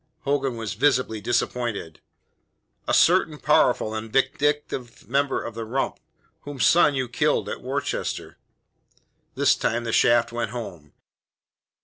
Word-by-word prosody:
Hogan 135 -3 -1
was 115 -2 -4
visibly 125 -3 +1
disappointed. 115 -7 -2 0.9
"A - - 0
certain - - +4
powerful 110 - +2
and 110 0 -5
vindictive 135 -1 -1
member 140 +2 0
of 115 - -6
the 115 +1 -5
Rump, 130 +5 -2 0.4
whose 145 -2 -2
son 155 -4 +5
you 130 -1 -1
killed 150 +5 0
at - - -5
Worcester." 135 +3 -4 1.0
This - - +4
time 120 +1 -1
the 115 -1 -3
shaft 120 0 +3
went 120 0 -3
home. 90 -11 -8
120 Hz, 125 wpm, -24 LUFS, 115-140 Hz, 1.0 s, son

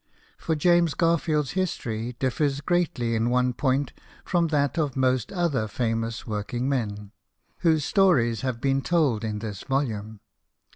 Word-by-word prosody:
For 160 - -1
James 170 0 +3
Garfield's 160 -4 +1
history 120 - -2
differs 140 +2 0
greatly 150 -8 0
in 115 +1 +1
one 125 0 +2
point 135 +1 0 0.3
from 175 -2 +1
that 145 -2 +1
of 145 -4 -1
most 130 -3 +1
other 165 - 0
famous 115 0 -2
work 105 +1 -4
ing 125 +2 -1
men, 105 -7 -2 0.5
whose 160 -4 +2
stories 135 - +3
have 130 -3 -2
been 135 +1 +1
told 140 -10 +1
in 105 -1 -2
this 105 -3 -6
volume. 110 -6 -2
130 Hz, 145 wpm, -25 LUFS, 115-155 Hz, 0.5 s, James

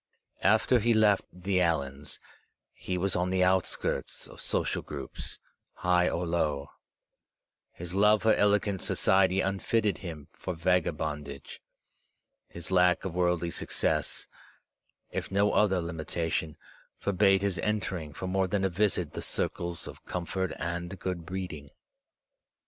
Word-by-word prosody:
After 110 +5 +4
he 115 +1 +3
left 105 -2 +4
the 90 +1 -1
Allans, 70 -5 -1 0.6
he 90 - -3
was 95 +1 0
on 90 +1 +1
the 95 0 +2
outskirts 95 0 0
of - - -12
social - - 0
groups, - - -7 0.4
high 90 0 +3
or 85 +1 -1
low. 75 -4 -1 1.0
His 85 +1 -6
love 105 +2 +4
for 110 -1 +5
elegant 100 -1 +2
society 95 0 +3
unfitted 100 +2 0
him 80 -6 -7
for 90 +2 -5
vagabondage. 80 -5 -1 0.9
His 85 +1 -8
lack 90 0 +4
of 95 - -3
worldly 90 -1 +1
success, - - -1 0.9
if - - -3
no 100 +1 +3
other 95 -3 +3
limitation, 80 -1 -3 0.4
forbade 95 0 +3
his 100 -2 0
entering 95 -7 -2
for 95 - -6
more 95 +1 +1
than 100 +1 0
a 95 - +3
visit 90 -3 0
the - - -4
circles 85 -1 -2
of - - -10
comfort 90 +1 -2
and 85 +2 -4
good 90 -3 -4
breeding. 90 -7 -5
90 Hz, 130 wpm, -29 LUFS, 85-95 Hz, 1.0 s, for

